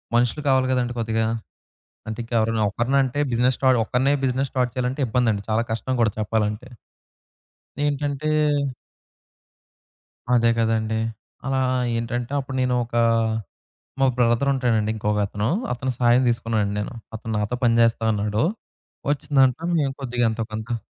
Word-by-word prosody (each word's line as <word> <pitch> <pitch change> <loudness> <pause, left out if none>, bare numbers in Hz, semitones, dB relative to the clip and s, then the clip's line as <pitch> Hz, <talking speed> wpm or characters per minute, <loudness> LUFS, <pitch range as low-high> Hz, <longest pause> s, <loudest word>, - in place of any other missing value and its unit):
మనుషులు 120 +5 +2
కావాలి 130 -1 +3
గదండీ 120 -1 0
కొద్దిగా. 110 0 0 0.8
అంటే 110 +1 -5
ఇంకెవరైనా 115 -1 +1
ఒకడినే 120 +6 0
అంటే 130 +2 -2
బిజినెస్ 125 +2 +2
స్టార్ట్ 130 -2 +4
ఒక్కన్నే 130 +5 +2
బిజినెస్ 130 +1 0
స్టార్ట్ 125 -2 +1
చేయాలంటే 125 +2 -1
ఇబ్బందండి. 115 -3 +1
చాలా 110 +2 +2
కష్టం 120 +3 -2
గూడా 110 -3 +3
చెప్పాలంటే. 105 +2 -1 1.2
ఏంటంటే 145 0 -1 2.1
అదే 115 -1 +4
కదండీ! 110 -1 +1 0.5
అలా 135 0 0 0.4
ఏంటంటే 120 +2 -3
అప్పుడు 130 0 -5
నేను 125 0 +1
ఒకా 120 0 0 1.0
మా 135 - +4
బ్రదర్ 120 +3 +3
ఉంటాడండి 115 -5 +1
ఇంకొక 105 -1 0
అతను. 105 +1 -2 0.3
అతని 130 +1 -2
సాయం 120 +1 +4
తీసుకున్నానండి 115 -3 0
నేను. 105 +5 -4 0.2
అతను 110 0 -5
నాతో 105 +4 -1
పని 115 -1 +4
జేస్తా 115 -1 +2
అన్నాడు. 105 +3 0 0.7
వచ్చిందాంట్లో 145 +2 +2
మేము 135 -2 0
కొద్దిగా 125 -2 0
ఎంతో 115 0 -3
కొంత 110 +1 -4
120 Hz, 130 wpm, -23 LUFS, 110-130 Hz, 2.1 s, స్టార్ట్